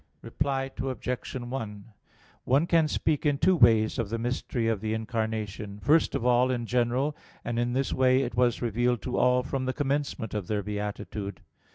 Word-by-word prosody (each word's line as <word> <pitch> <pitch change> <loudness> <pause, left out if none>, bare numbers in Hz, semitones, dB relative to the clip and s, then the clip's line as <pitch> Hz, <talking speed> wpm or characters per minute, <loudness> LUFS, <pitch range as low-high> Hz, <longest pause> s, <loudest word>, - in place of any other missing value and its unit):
Reply 135 +2 -1
Obj. 125 -1 -3
1: 120 -5 -5 0.6
One 135 +6 +3
can 165 -2 +3
speak 150 -1 0
in 145 -2 +2
two 185 +5 +4
ways 115 -7 +4
of 115 -4 -1
the 115 - -2
mystery 120 0 -2
of 110 -3 0
the 110 0 -1
Incarnation. 110 -2 -3
First 155 +8 +3
of 115 - -2
all, 125 +1 +4
in 120 -2 -1
general; 125 +5 0 0.3
and 120 0 -1
in 120 0 0
this 135 +1 0
way 130 +1 +3
it - - -4
was 120 0 +1
revealed 120 +1 0
to 125 - -2
all 125 0 +3
from 135 0 -3
the 130 - -1
commencement 140 -6 -2
of 105 -4 -3
their 105 -1 -1
beatitude. 105 0 -5
120 Hz, 180 wpm, -28 LUFS, 110-135 Hz, 0.6 s, two